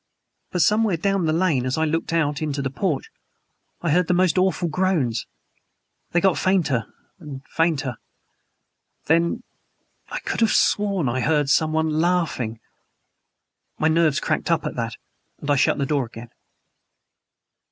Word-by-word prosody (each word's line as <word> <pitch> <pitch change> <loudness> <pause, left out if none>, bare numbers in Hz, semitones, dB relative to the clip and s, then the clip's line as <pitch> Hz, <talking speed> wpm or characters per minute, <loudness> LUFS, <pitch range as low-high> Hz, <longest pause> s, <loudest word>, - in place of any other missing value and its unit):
But 180 -3 +2
somewhere 210 -4 +2
down 195 0 0
the - - +2
lane, 160 -6 +1
as 130 +2 -1
I 160 - +2
looked 165 +2 -1
out 150 -3 0
into 145 -2 -2
the 135 - -2
porch, 155 -2 -2 0.7
I 170 - +1
heard 180 +2 +2
most 180 -1 +3
awful 185 -2 +1
groans! 155 -9 0 0.8
They 175 - +2
got 190 +2 +2
fainter 170 -11 +1 0.3
and 140 -5 -9
fainter. 150 -7 0 1.1
Then 170 +9 +1 0.7
I - - -4
could - - -3
have 225 - +3
sworn 200 -7 +2
I 120 +2 -1
heard 145 +1 +1
SOMEONE 155 +2 +2
LAUGHING! 160 -10 0 1.2
My 160 - +2
nerves 160 -1 +3
cracked - - -1
up 165 -2 +1
at - - -3
that; 115 -2 -3 0.4
and 145 - -3
I - - +4
shut 135 - +2
the 140 - 0
door 140 -3 0
again." 115 +1 -11
160 Hz, 145 wpm, -23 LUFS, 140-180 Hz, 1.2 s, I